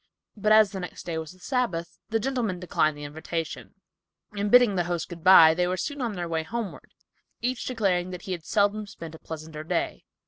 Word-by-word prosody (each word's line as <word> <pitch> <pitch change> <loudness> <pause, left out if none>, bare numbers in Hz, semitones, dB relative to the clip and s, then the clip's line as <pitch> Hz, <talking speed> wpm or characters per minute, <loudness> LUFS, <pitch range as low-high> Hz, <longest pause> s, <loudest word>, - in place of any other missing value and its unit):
But 210 0 0
as 215 -2 +6
the 195 - -5
next 180 - -7
day 165 -2 -2
was 160 -1 -7
the 185 - -17
Sabbath, 180 -8 -2
the 225 0 +1
gentlemen 230 -7 -1
declined 155 -4 +1
the 145 - -8
invitation, 160 +2 -5 0.6
and 205 -1 -2
bidding 245 -2 +6
the 175 -2 0
host 175 -2 -3
"good 170 -2 -9
bye," 165 -4 +9
they 180 +2 +1
were 185 +1 -1
soon 285 +7 -4
on 235 -4 -1
their 175 -3 -4
way 165 -1 -1
homeward, 215 +4 -6 0.4
each 250 0 -2
declaring 195 -7 0
that 180 -1 -7
he 190 - -6
had 175 -3 -4
seldom 205 +3 +1
spent 165 -4 -9
a 160 - -11
pleasanter 155 -1 -8
day. 155 - -2
180 Hz, 210 wpm, -26 LUFS, 165-215 Hz, 0.6 s, bye